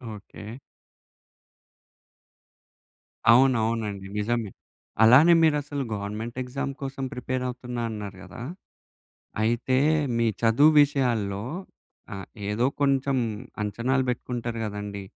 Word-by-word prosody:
Okay. 105 +3 -10 2.7
అవునవునండి. 115 -5 +2
నిజమే. 110 0 -1 0.5
అలానే 135 +10 +8
మీరసలు 145 -2 +1
గవర్నమెంట్ 105 +4 -5
ఎక్సామ్ 140 +2 -4
కోసం 135 0 -5
ప్రిపేరవుతున్నా 125 -1 -4
అన్నారు 105 -3 -6
గదా! 100 +5 -10 1.0
అయితే, 120 +3 +1 0.4
మీ 115 - +2 0.2
చదువు 130 +7 +5
విషయాల్లో 120 -9 0 0.7
ఆహ్, 95 -2 -8 0.2
ఏదో 115 +4 +1
కొంచం 135 -1 +2 0.5
అంచనాలు 120 +6 0
బెట్టుకుంటారు 120 -1 -3
గదండీ 105 -1 -5
120 Hz, 85 wpm, -26 LUFS, 105-135 Hz, 2.7 s, అలానే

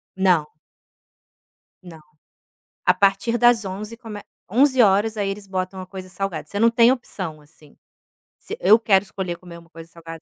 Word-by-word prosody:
Não. 180 -6 +1 1.3
Não. 170 -3 -12 0.9
A - - +5
partir 200 +4 +1
das 240 -3 +4
11:00 210 +4 -6
come 220 -4 -9 0.3
11:00, 225 -4 +3
aí 200 -1 -1
eles 200 0 -7
botam 185 0 -4
a - - -8
coisa 185 -1 -9
salgada, 180 -6 -5
você 200 +5 -5
não 230 - +5
tem 235 +1 +5
opção, 185 -11 -5
assim, 150 0 -21 0.6
se - - -8
eu 205 +5 +6
quero 200 -4 +3
escolher 185 -4 -5
comer 175 -1 -12
uma 170 0 -17
coisa 165 -1 -13
salgada 165 -1 -11
195 Hz, 160 wpm, -22 LUFS, 170-215 Hz, 1.3 s, eu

